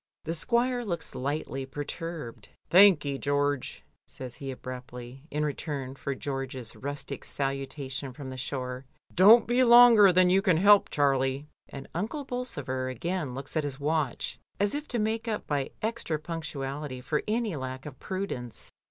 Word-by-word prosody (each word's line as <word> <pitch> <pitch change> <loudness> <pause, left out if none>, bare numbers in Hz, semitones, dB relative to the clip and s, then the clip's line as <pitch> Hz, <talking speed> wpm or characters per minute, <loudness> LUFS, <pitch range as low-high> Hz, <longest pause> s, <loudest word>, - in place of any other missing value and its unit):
The 165 - -3
squire 245 +7 0
looks 175 -6 -4
lightly 135 0 -3
perturbed. 150 -1 -6 0.2
"Thank 185 -4 +7
ye, 140 -1 -2
George," 145 -1 -1 0.2
says 130 -2 -8
he 135 +2 -7
abruptly, 125 0 -8
in 150 +1 -1
return 145 -3 -4
for 135 0 -4
George's 130 -3 -5
rustic 140 +1 -5
salutation 135 0 -3
from 130 0 -8
the - - -6
shore. 130 0 -4 0.3
"Don't 210 +6 +8
be 245 +2 +3
longer 235 -4 +8
than 180 0 +4
you 190 +1 +4
can 185 -6 +3
help, 200 +3 +6
Charlie," 135 -1 +1 0.2
and 135 -1 -8
Uncle 220 - -3
Bolsover 145 - -3
again 150 +1 -3
looks 135 +3 -7
at 155 - +1
his 140 -1 -5
watch, 150 -3 -1 0.2
as 200 0 +2
if 295 +1 -4
to 245 - -2
make 225 +1 -1
up 215 -2 -2
by 140 -2 -1
extra 220 -8 -1
punctuality 150 -4 -5
for 150 +4 -1
any 220 -3 0
lack 130 -1 -5
of 145 -3 -9
prudence. 185 - -5
145 Hz, 155 wpm, -28 LUFS, 135-190 Hz, 0.3 s, Don't